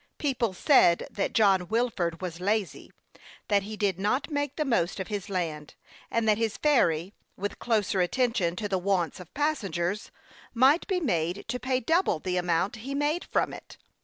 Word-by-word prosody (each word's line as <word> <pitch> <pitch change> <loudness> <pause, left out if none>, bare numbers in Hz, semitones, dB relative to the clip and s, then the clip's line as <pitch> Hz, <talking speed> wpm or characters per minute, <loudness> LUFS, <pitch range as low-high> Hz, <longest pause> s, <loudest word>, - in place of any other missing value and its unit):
People 255 -7 0
said 180 - +4
that 200 - -2
John 195 -6 +3
Wilford 200 -7 -1
was 170 -2 -5
lazy; 205 +1 -2 0.6
that 205 -1 +4
he 210 +2 -7
did 195 -4 0
not 255 +10 0
make 290 -1 -2
the 305 - -1
most 200 -9 0
of 190 - -4
his 205 -1 -4
land, 160 -6 -3 0.3
and 230 -1 0
that 215 0 +3
his 225 -2 -1
ferry, 190 - +2 0.2
with 205 +1 -4
closer 210 -4 +1
attention 190 -3 +1
to 210 +2 -3
the 190 -2 0
wants 185 -3 0
of 180 -3 -11
passen 295 -8 0
gers, 175 +6 -2 0.5
might 270 +7 +4
be 380 -3 0
made 180 - -1
to 250 - -2
pay 255 0 0
double 325 - +2
the 180 +3 -2
amount 180 +5 0
he 265 +5 -5
made 295 +4 0
from - - 0
it. - - -11
205 Hz, 180 wpm, -27 LUFS, 180-255 Hz, 0.6 s, said